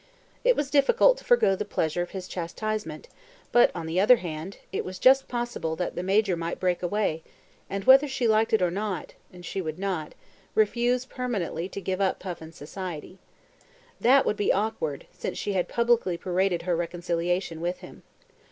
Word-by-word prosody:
It - - +4
was 285 -2 -2
difficult 485 - +4
to - - -15
forgo 485 - +4
the 200 - -3
pleasure 175 -4 -1
of 175 - -3
his 185 -2 -7
chastisement, 180 -1 -4 0.4
but, 240 - +6
on 170 -2 -4
the 165 +3 -1
other 210 +6 +7
hand, 175 -2 -6
it - - -2
was 185 0 -7
just 265 +6 +5
possible 240 -10 -3
that 180 +1 -3
the - - -2
Major 195 0 +2
might 170 0 -4
break 180 -1 0
away, 180 -3 -1 0.5
and, 195 0 -3
whether 270 +3 +7
she 260 -3 -1
liked 220 0 +3
it 220 -4 +3
or 175 - +2
not 195 -3 -4 0.2
(and 180 -1 -12
she 195 - -3
would 155 -2 -5
not), 185 -5 -3 0.4
refuse 240 +4 +2
permanently 205 - -3
to - - -6
give 190 0 -3
up 190 - +1
Puffin's 165 -3 -8
society. 180 +2 -7 0.8
That 265 +3 +5
would 210 - 0
be 205 - +2
awkward 195 -9 -2
since - - -5
she 205 - -2
had 180 -2 0
publicly 235 -7 +1
paraded 180 0 0
her 175 -1 0
reconciliation 170 0 -2
with 175 +1 -3
him. - - -12
190 Hz, 180 wpm, -26 LUFS, 175-220 Hz, 0.8 s, other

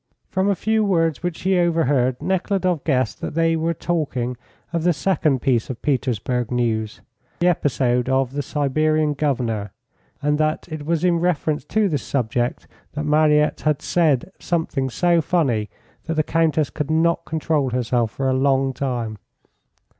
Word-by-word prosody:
From 190 +1 +1
a 200 - +2
few 220 +3 +1
words 165 -6 +1
which 175 -2 -3
he 190 0 +2
overheard, 145 -7 +2
Nekhludoff 185 -3 0
guessed 130 -6 0
that - - -5
they 165 0 +2
were 165 +1 -1
talking 135 -9 -2 0.4
of 170 - 0
the 175 +1 +3
second 150 -5 0
piece 125 -5 +1
of 130 - -5
Petersburg 125 -3 -1
news, 115 -3 -1 0.4
the 175 - 0
episode 130 -6 +1
of 130 -1 +1
the 145 - -1
Siberian 155 +2 +1
Governor, 120 -9 -1 0.5
and 150 +1 0
that 155 0 0
it 155 -2 -6
was 170 0 0
in 175 -2 +3
reference 160 -3 0
to 215 -1 +1
this 150 -8 -1
subject 120 -1 -2 0.3
that 150 0 -3
Mariette 150 0 +3
had 150 -1 0
said 165 -1 +1
something 160 -6 -1
so 170 +5 +2
funny 135 -11 0 0.4
that 165 - -2
the 155 - +2
Countess 160 -2 +1
could 150 -1 -4
not 165 +1 +2
control 155 -3 0
herself 120 -2 0
for 135 +4 -3
a 130 - +2
long 135 0 +2
time. 120 -6 -3
150 Hz, 160 wpm, -22 LUFS, 130-165 Hz, 0.5 s, the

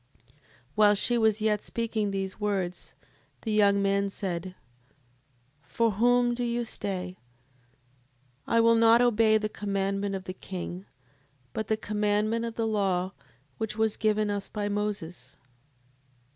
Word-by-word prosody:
7:30. 130 - -33 0.4
While 210 +2 +5
she 240 +4 +2
was 220 -1 +2
yet 210 -1 +1
speaking 225 -3 -2
these 195 0 -4
words, 195 -4 -3 0.5
the 220 - -2
young 200 -1 +4
man 200 0 +1
said: 185 -2 -4 1.1
For 225 +10 0
whom 240 +3 +3
do 245 +1 -3
you 240 0 -1
stay? 185 -4 -5 1.3
I 230 - +4
will 230 0 +5
not 230 0 +6
obey 225 -2 +4
the 215 0 -1
commandment 200 -1 -2
of 190 - -5
the 185 - -6
king, 185 0 -7 0.7
but 220 - -3
the 220 - +1
commandment 210 +2 0
of 230 -1 -5
the 225 - -1
law 195 -4 0 0.5
which 220 -1 -3
was 220 -1 +1
given 215 -1 +1
us 200 -1 -3
by 205 -1 -3
Moses. 205 -4 -4
210 Hz, 140 wpm, -28 LUFS, 195-220 Hz, 1.3 s, not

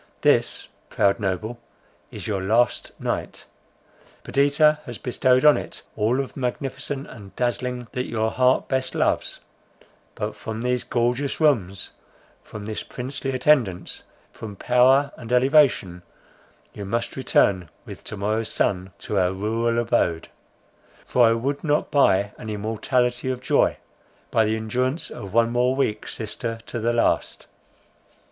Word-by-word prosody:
This, - - +2 0.2
proud 100 0 +2
noble, 105 +4 -3 0.5
is - - -8
your 100 -3 -1
last 115 +6 +1
night! - - -4 0.8
Perdita 150 +2 +3
has 120 -3 -6
bestowed 125 +4 +2
on 150 - +7
it - - -8
all 110 +5 +1
of 135 - -4
magnificent 135 +2 -3
and 100 -8 -12
dazzling 125 0 -2
that 125 0 -3
your 110 -1 -1
heart 130 0 +2
best 130 0 -1
loves—but, - - -4
from 110 +1 -6
these 125 0 0
gorgeous 120 +3 -1
rooms, 105 - +1 0.5
from 105 -1 -9
this 110 0 -4
princely 135 +2 -5
attendance, 125 -9 +1 0.3
from 105 -3 -8
power 130 +6 +4
and 120 -1 -9
elevation, 125 - +3 0.7
you 100 - -7
must 115 +4 -2
return 95 - +2 0.2
with - - -10
to 110 - -6
morrow's 110 +3 -1
sun 95 -1 -1
to 100 - -2
our 90 -1 +2
rural 115 +4 -1
abode; 115 -8 0 0.8
for 120 -2 +4
I 115 - +4
would 135 +5 -2
not 150 -2 0
buy 100 -8 +3
an 110 - -7
immortality 120 +4 -1
of 130 -1 -2
joy, - - +2 0.5
by 110 - +3
the 110 +1 +1
endurance 125 +7 -2
of 100 - -8
one 115 +1 +3
more 125 +2 +2
week 110 -6 -1
sister 115 +1 -4
to 120 - -5
the 115 +1 +1
last. 120 - 0
120 Hz, 140 wpm, -23 LUFS, 105-130 Hz, 0.8 s, on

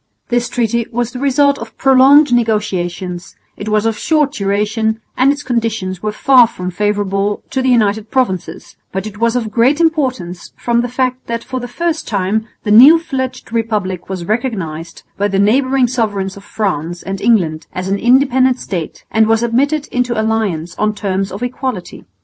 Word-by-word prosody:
This 240 0 0
treaty 235 -1 -1
was 240 0 -2
the 250 - -7
result 280 +1 +2
of 230 0 -10
prolonged 270 +1 +5
negotiations; 190 -6 -2 0.2
it 205 - -6
was 215 0 +1
of 225 -2 -1
short 300 -3 +1
duration 220 0 -1 0.2
and 260 +2 +4
its 290 0 -4
conditions 220 -7 -2
were 215 - -2
far 250 +2 +5
from 180 -4 -6
favourable 205 +1 -1
to 265 - 0
the 260 - +1
United 220 -3 +1
Provinces, 240 -9 -2 0.2
but 190 +2 -3
it 210 -1 -8
was 230 +1 +1
of 225 -3 -2
great 245 +7 +3
importance 260 - -1
from 235 0 +1
the 245 - -3
fact 255 0 -2
that 235 0 -3
for 260 -1 -4
the 245 - -6
first 330 +5 -2
time 210 +2 -1 0.2
the 210 - -1
new 265 +10 +9
fledged 260 -7 -5
republic 210 -6 -2
was 185 -3 -4
recognised 180 -8 -3 0.2
by 205 - +2
the 195 -1 -1
neighbouring 260 +6 +3
sovereigns 205 -6 -2
of 200 - -12
France 175 -6 -3
and 195 0 -5
England 165 -9 +1
as 185 0 -4
an 200 +1 -1
independent 255 +1 +3
state 175 -9 -6
and 220 0 +3
was 225 +1 +2
admitted 280 +6 0
into 245 -2 -1
alliance 210 -7 -1
on 215 0 +1
terms 195 -1 -2
of 195 +6 -6
equality. 245 -6 -5
225 Hz, 175 wpm, -16 LUFS, 195-255 Hz, 0.2 s, new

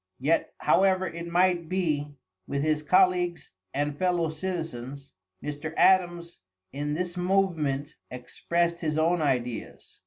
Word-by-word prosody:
Yet, 150 +6 0
however 190 -1 +3
it 170 0 -6
might 175 -1 +2
be 150 -6 -1 0.3
with 140 0 -2
his 155 -1 +1
colleagues 180 +1 +2 0.2
and 145 +1 -1
fellow 175 -3 +1
citizens, 150 -6 -5 0.3
Mr. 150 +2 -5
Adams, 175 -2 +3 0.3
in 145 +1 -2
this 180 +1 -3
movement, 165 -6 0 0.2
expressed 170 +7 -2
his 155 -2 -2
own 165 +2 +2
ideas. 125 -5 -3
165 Hz, 120 wpm, -27 LUFS, 145-180 Hz, 0.3 s, however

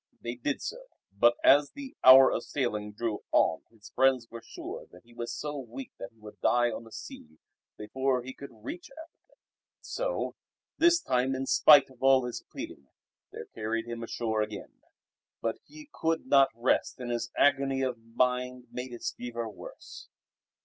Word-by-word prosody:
They 120 - -4
did 125 +3 -3
so; - - -6 0.3
but 120 +3 +5
as 145 0 +5
the 275 -2 -9
hour 130 +1 +9
of - - -1
sailing 105 -6 -2
drew 110 0 -3
on - - +3
his 110 -3 -16
friends 130 -3 +2
were 115 0 -8
sure - - -8
that 90 - -17
he 120 0 -20
was 120 0 -5
so 150 -1 -4
weak 130 +1 -8
that 120 - -6
he 115 - -32
would 105 -1 -13
die 120 0 +3
on 115 - -7
the 115 - -15
sea 80 -6 -10 0.4
before 130 +3 -1
he 130 +1 -7
could 140 - -10
reach 120 +10 -8
Africa. 320 +4 -16 0.4
So - - -3 0.5
this 340 +1 +5
time 130 - 0
in 135 +1 -3
spite 145 -1 +6
of 130 - -20
all 135 -1 +5
his 125 - -5
pleading 70 - -8 0.4
they - - -7
carried 115 +1 -2
him 120 0 -6
ashore 115 -1 -2
again. 110 - -6 0.6
But - - -2
he 305 0 -13
could 165 0 -1
not 135 0 +5
rest 120 +2 0
and 120 -1 -4
his 120 -1 -2
agony 135 -1 +3
of 125 -3 -2
mind 125 +2 -1
made 125 0 -6
his 120 - -4
fever 120 -1 -5
worse. 110 - -11
125 Hz, 175 wpm, -29 LUFS, 115-135 Hz, 0.6 s, hour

